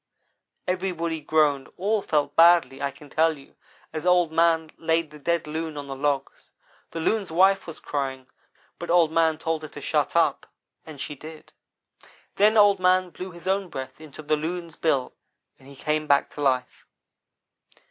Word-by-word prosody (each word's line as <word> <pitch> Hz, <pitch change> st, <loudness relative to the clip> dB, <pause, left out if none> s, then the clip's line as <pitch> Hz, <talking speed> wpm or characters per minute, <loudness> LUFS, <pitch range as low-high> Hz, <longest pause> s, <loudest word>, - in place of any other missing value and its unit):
Everybody 180 Hz, -3 st, -2 dB
groaned 150 Hz, -3 st, +1 dB
all 205 Hz, +3 st, 0 dB
felt 145 Hz, -5 st, 0 dB
badly, 165 Hz, -5 st, +5 dB
I 140 Hz, -, 0 dB
can 145 Hz, +2 st, -14 dB
tell 160 Hz, +2 st, +1 dB
you, 135 Hz, -, -18 dB, 0.4 s
as 155 Hz, -, -4 dB
Old 180 Hz, -2 st, +3 dB
man 165 Hz, -1 st, +2 dB
laid 165 Hz, -1 st, 0 dB
the 150 Hz, -, -12 dB
dead 170 Hz, +2 st, 0 dB
Loon 155 Hz, 0 st, -4 dB
on 145 Hz, -, -5 dB
the 135 Hz, -1 st, -6 dB
logs. 140 Hz, 0 st, -2 dB, 0.4 s
The 165 Hz, -, -6 dB
Loon's 200 Hz, +3 st, 0 dB
wife 190 Hz, +4 st, +3 dB
was 165 Hz, -, -8 dB
crying, 135 Hz, -2 st, -4 dB, 0.5 s
but -, -, -6 dB
Old 170 Hz, -2 st, +4 dB
man 160 Hz, -1 st, +2 dB
told 160 Hz, 0 st, -2 dB
her 155 Hz, -, -7 dB
to -, -, -11 dB
shut -, -, -1 dB
up -, -, +2 dB, 0.4 s
and 155 Hz, -3 st, -10 dB
she 150 Hz, -, -5 dB
did. 155 Hz, +2 st, -12 dB, 0.8 s
"Then 215 Hz, +2 st, +4 dB
Old 205 Hz, -2 st, +6 dB
man 185 Hz, 0 st, +2 dB
blew 185 Hz, +3 st, -7 dB
his 175 Hz, 0 st, -12 dB
own 190 Hz, -1 st, 0 dB
breath 130 Hz, +2 st, -7 dB
into 155 Hz, 0 st, -11 dB
the 150 Hz, +1 st, +1 dB
Loon's 165 Hz, +1 st, -5 dB
bill, 140 Hz, -6 st, 0 dB, 0.5 s
and 135 Hz, -, -18 dB
he 140 Hz, -, -13 dB
came 150 Hz, +2 st, -2 dB
back 140 Hz, -1 st, +3 dB
to 145 Hz, -, -8 dB
life. 130 Hz, -3 st, -1 dB
160 Hz, 175 wpm, -25 LUFS, 145-175 Hz, 0.8 s, Old